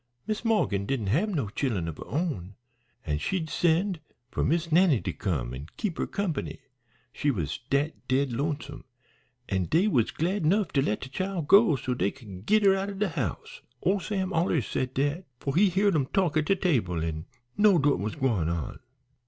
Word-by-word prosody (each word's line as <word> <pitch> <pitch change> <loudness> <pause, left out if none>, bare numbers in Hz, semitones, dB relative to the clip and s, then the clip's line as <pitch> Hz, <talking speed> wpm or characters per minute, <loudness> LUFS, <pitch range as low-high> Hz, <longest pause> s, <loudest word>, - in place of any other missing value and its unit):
Miss 215 0 -2
Morgan 110 - +1
didn't 110 -6 -1
hab 195 +10 +2
no 145 - -1
chillen 105 - -1
of 80 - -5
her - - -8
own, 130 - -3 0.5
an' 75 -1 -1
she'd 160 - -2
send 175 +2 +1 0.3
for - - -1
Miss 165 +2 0
Nannie 165 - +5
to - - -4
come 70 - -2
an' 70 +4 -7
keep 195 -7 -3
her - - 0
company, 195 -7 -3 0.6
she 145 - 0
was 80 - -2
dat 145 +3 -1
dead 130 -1 +1
lonesome, 145 +1 -3 0.6
an' 95 -2 0
dey 165 - +2
was 125 - +2
glad 180 +4 -1
'nough 195 +4 +2
to 140 - +1
let 105 -6 -1
dat 130 - -8
chile 185 +1 -2
go 200 -5 +6
so 125 0 -2
dey 120 - +1
could 100 -4 -11
git 215 0 +4
her 195 -1 +6
out 195 +1 -1
o' - - -5
de 210 +2 0
house. 480 +1 -4 0.2
Ole 195 +1 +2
Sam 190 -1 -2
allers 165 - +1
said 130 0 -3
dat, 145 +7 0
for 140 0 -3
he 195 +3 +5
heared 195 +3 +2
'em 140 -5 +1
talk 185 -4 +1
at 155 -1 +1
table 125 - +1
an' 80 -1 -4 0.3
knowed 200 -7 +4
what 145 - +3
was 105 +2 -3
gwine 110 -12 0
on. 85 -5 -3
150 Hz, 195 wpm, -27 LUFS, -, 0.6 s, go